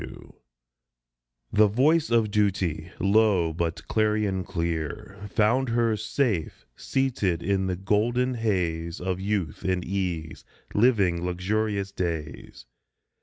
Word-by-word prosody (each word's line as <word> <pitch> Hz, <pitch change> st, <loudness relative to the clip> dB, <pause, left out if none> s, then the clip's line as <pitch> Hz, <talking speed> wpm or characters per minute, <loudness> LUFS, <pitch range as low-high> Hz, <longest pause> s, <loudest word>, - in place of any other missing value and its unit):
S. -, -, -6 dB
W. -, -, -13 dB, 1.2 s
THE 105 Hz, 0 st, +6 dB
voice 150 Hz, +10 st, +3 dB
of 115 Hz, -3 st, +2 dB
Duty, 95 Hz, -6 st, 0 dB
low, 100 Hz, -4 st, +3 dB
but 85 Hz, 0 st, -3 dB
clarion 105 Hz, -3 st, +1 dB
clear, 85 Hz, +4 st, -4 dB
Found 120 Hz, +6 st, +2 dB
her, 115 Hz, -1 st, +2 dB
safe 110 Hz, -, -1 dB
seated 105 Hz, -11 st, -1 dB
in 95 Hz, 0 st, 0 dB
the 90 Hz, -, -1 dB
golden 115 Hz, +7 st, +1 dB
haze 85 Hz, -8 st, -1 dB
Of 90 Hz, 0 st, -2 dB
youth 95 Hz, -6 st, -2 dB
and 90 Hz, -1 st, 0 dB
ease, 90 Hz, -5 st, -3 dB, 0.3 s
living 100 Hz, -7 st, +3 dB
luxurious 100 Hz, +3 st, -1 dB
days. 75 Hz, -9 st, -5 dB
100 Hz, 115 wpm, -26 LUFS, 85-110 Hz, 1.2 s, THE